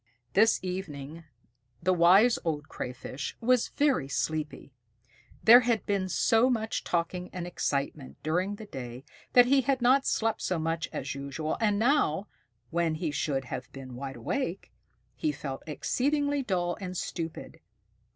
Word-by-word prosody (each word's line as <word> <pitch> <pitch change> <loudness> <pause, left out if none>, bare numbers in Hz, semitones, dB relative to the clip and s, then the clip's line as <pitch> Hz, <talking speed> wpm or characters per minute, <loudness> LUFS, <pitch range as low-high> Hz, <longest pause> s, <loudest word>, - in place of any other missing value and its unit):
This 220 +3 +5
evening 165 -4 -6 0.6
the 185 +1 +3
Wise 190 +7 +5
Old 150 -3 -2
Crayfish 130 +2 -6
was 250 0 +3
very 275 - +1
sleepy. 150 0 -3 0.7
There 235 +2 +10
had 235 -3 0
been 195 -2 0
so 225 +7 +3
much 220 -3 -1
talking 180 +1 -2
and 180 -2 -5
excitement 140 -5 -3
during 180 +6 0
the 215 - -9
day 125 - -8 0.3
that 245 -1 +8
he 270 +2 +4
had 270 0 +1
not 265 +3 +4
slept 225 0 0
so 180 - 0
much 165 0 -2
as 135 - -4
usual; 140 +3 -3
and 210 -2 +2
now, 220 - +2 0.4
when 170 -1 +1
he 155 -1 -2
should 140 -2 -1
have 125 +1 -6
been 130 -2 -9
wide 135 +1 -6
awake, 190 - -3 0.4
he 310 - 0
felt 135 - -6
exceedingly 285 - 0
dull 180 -7 -1
and 185 -1 -5
stupid. 165 -1 -5
175 Hz, 145 wpm, -29 LUFS, 150-225 Hz, 0.7 s, There